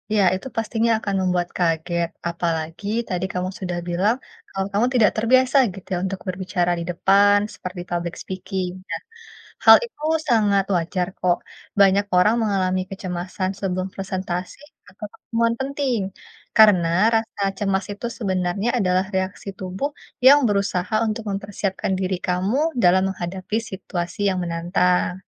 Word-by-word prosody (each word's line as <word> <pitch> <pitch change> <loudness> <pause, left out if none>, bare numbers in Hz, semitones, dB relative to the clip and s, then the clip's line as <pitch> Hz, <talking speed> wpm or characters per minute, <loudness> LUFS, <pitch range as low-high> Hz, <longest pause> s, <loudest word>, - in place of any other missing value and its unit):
ya, 205 - +4
itu 190 - -6
pastinya 225 +1 +1
akan 200 -3 -2
membuat 180 -1 0
kaget. 170 0 0 0.2
Apalagi 165 +2 -3 0.2
tadi 180 0 -1
kamu 180 0 -2
sudah 180 -2 -3
bilang, 190 +7 +2 0.4
kalau 195 0 -2
kamu 210 +4 +3
tidak 225 -4 +5
terbiasa 255 +4 +4 0.2
gitu, 195 - -12
ya, - - +1
untuk 195 0 -4
berbicara 180 -1 -1
di - - -3
depan, 200 +3 +4 0.2
seperti 180 -1 -7
public 170 0 -2
speaking, 190 -1 -4 0.2
nah, 165 0 -3 0.6
hal - - +11
itu 460 -11 -18 0.3
sangat 205 -4 +3
wajar, 175 +1 -1
kok, 175 -1 +2 0.4
banyak 200 0 +5
orang 210 +5 +5
mengalami 185 -3 +1
kecemasan 185 -1 -4
sebelum 185 -1 -2
presentasi 185 +1 -4 0.3
atau 205 +3 -8
pertemuan 230 0 -1
penting. 270 -4 -1 0.6
Karena 200 -6 +6 0.3
rasa 225 -2 -2 0.2
cemas 195 -1 0
itu 220 +4 -5
sebenarnya 190 +1 -1
adalah 185 -2 +2
reaksi 190 +2 -3
tubuh 190 +9 -3 0.4
yang 280 +2 +9
berusaha 200 -1 0
untuk 220 +1 -3
mempersiapkan 195 -1 -3
diri 185 -1 -1
kamu 205 - 0
dalam 185 +1 +5
menghadapi 185 +4 -4
situasi 180 -2 -5
yang 185 -1 -1
menantang. 175 +2 +1
190 Hz, 140 wpm, -22 LUFS, 180-205 Hz, 0.6 s, hal